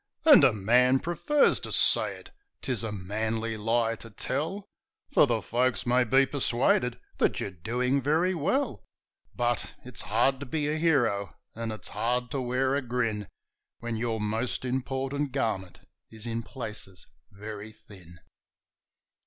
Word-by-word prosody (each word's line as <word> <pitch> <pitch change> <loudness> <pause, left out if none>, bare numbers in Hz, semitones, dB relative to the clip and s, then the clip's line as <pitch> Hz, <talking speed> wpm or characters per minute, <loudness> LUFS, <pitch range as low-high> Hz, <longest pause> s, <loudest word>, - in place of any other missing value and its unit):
And 305 -3 +9
a - - +7
man 125 +5 +3
prefers 175 - +2
to - - -6
say - - +4
it - - -14 0.3
'tis 125 -5 -2
a 110 - -3
manly 110 +3 -2
lie 115 +1 +1
to 115 - -10
tell, 155 - -3 0.5
For - - +6
the 115 -3 0
folks 125 +1 0
may 125 +1 +3
be 135 +4 +4
persuaded 125 -2 +1 0.2
that - - +2
you're - - -3
doing 125 +10 -1
very 160 +7 +2
well; 170 - -1 0.5
But 120 -2 -1
it's 125 -2 -6
hard 125 +5 +1
to 140 - -7
be 150 +2 -1
a 150 +1 0
hero, 120 -12 +1 0.2
and 115 0 -4
it's 110 - -6
hard 125 +1 -1
to 140 -2 -2
wear 130 +2 0
a 140 - +1
grin, 115 -5 -2 0.5
When 120 -1 -4
your 110 0 -2
most 110 +5 -2
important 135 +2 -2
garment 95 -6 -2 0.3
is 110 0 -10
in 115 0 -2
places 110 -6 -7 0.2
very 105 +1 -8
thin. 85 -5 -16
120 Hz, 150 wpm, -28 LUFS, 110-135 Hz, 0.5 s, And